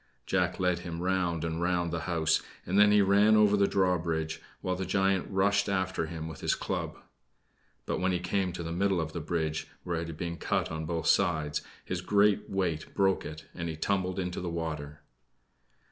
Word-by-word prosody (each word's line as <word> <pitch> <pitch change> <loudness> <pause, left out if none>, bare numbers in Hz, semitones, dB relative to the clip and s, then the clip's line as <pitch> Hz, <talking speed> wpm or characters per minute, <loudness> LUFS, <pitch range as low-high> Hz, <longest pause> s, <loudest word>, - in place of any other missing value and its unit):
Jack 90 -1 0
led 90 -1 +2
him 85 -1 -6
round 90 -3 0
and 80 0 -2
round 85 -1 +1
the 85 - -1
house, 80 -2 +2 0.2
and 95 +3 +2
then 105 0 +7
he 105 -1 +6
ran 100 +2 +5
over 105 -1 +5
the 100 -1 +3
drawbridge, 85 -4 0 0.2
while 90 0 -1
the 95 - -3
giant 95 -1 +1
rushed 100 +1 +2
after 95 -3 0
him 80 -1 -5
with 80 - -8
his - - +1
club. - - -3 0.9
But - - -2
when 95 0 +1
he 90 - +1
came 90 +1 0
to 85 - -5
the 80 - -4
middle 95 +1 +1
of 80 -1 -3
the 85 - -3
bridge, 80 -1 -2 0.2
where 85 -2 -2
it 85 - -4
had 80 -2 -7
been 85 0 -4
cut - - -1
on 80 0 -3
both 85 -1 -2
sides, 75 -3 +2 0.2
his 90 -1 -3
great 105 +2 +3
weight 85 -5 -2
broke 95 -1 +2
it, 75 0 -9
and 85 -1 -4
he 80 - -4
tumbled 95 +1 0
into 90 -1 -2
the 90 - -3
water. 75 -3 -4
90 Hz, 200 wpm, -30 LUFS, 80-95 Hz, 0.9 s, then